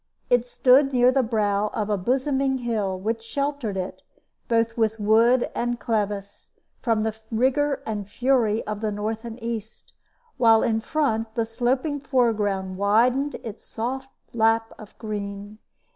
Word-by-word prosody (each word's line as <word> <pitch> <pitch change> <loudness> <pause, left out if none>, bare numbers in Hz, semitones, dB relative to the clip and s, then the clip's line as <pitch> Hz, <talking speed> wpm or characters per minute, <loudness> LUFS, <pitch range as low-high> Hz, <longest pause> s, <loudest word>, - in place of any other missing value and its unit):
It 245 0 +3
stood 265 +3 +4
near 250 0 +5
the 265 +1 +3
brow 210 -3 0
of 215 -1 -1
a - - +3
bosoming 265 +6 0
hill, 205 -6 -1
which 225 +4 -2
sheltered 275 -4 -3
it, 185 0 -5 0.5
both 230 0 +1
with 225 -1 0
wood 230 +4 +3
and 240 0 -2
clevice, 205 -3 -3 0.3
from 225 -3 +1
the 220 0 -1
rigor 265 +5 +1
and 205 -2 -4
fury 235 -2 +1
of 210 0 -4
the 215 -1 -1
north 215 +2 -3
and 230 0 -7
east; 225 -2 -6 0.4
while 225 -2 +5
in 225 -1 +1
front 225 -6 -1
the 230 - +1
sloping 255 +6 -1
foreground 210 -8 0
widened 245 +8 +2
its 225 -2 -8
soft 260 +4 -4 0.2
lap 225 0 +2
of 215 - -13
green. 205 -1 -6
225 Hz, 145 wpm, -24 LUFS, 210-250 Hz, 0.5 s, near